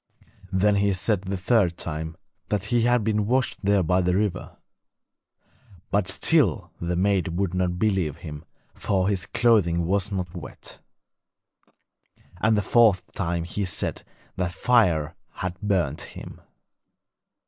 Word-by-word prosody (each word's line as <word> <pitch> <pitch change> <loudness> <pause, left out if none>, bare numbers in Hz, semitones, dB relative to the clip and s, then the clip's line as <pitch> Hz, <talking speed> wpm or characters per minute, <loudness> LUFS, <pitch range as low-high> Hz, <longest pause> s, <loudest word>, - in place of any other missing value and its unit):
Then 100 +2 +3
he 100 0 +2
said 95 +1 0
the 95 0 -4
third 90 -3 +2
time, 80 0 -5 0.3
that 105 -1 -1
he 120 - +4
had 120 -2 +3
been 105 -1 0
washed 130 +1 0
there 100 -2 +3
by 90 +3 +2
the 90 0 +1
river. 100 -3 -2 1.3
But 100 -2 +1
still 105 - +1
the 85 +1 -1
maid 95 -2 +1
would 95 -2 -1
not 90 -1 0
believe 95 -7 0
him, 75 -3 -8 0.3
for 95 -1 0
his 95 -3 -1
clothing 95 -8 +3
was 100 +3 0
not 90 -3 -3
wet. 85 -5 -8 1.6
And 110 +4 +2
the 105 - +1
fourth 110 -4 +3
time 85 -2 -2
he 100 +4 -3
said 90 -3 -2 0.4
that 90 -2 -1
fire 85 -10 +2 0.2
had 95 0 -5
burnt 90 -8 0
him. - - -9
95 Hz, 135 wpm, -25 LUFS, 85-105 Hz, 1.6 s, he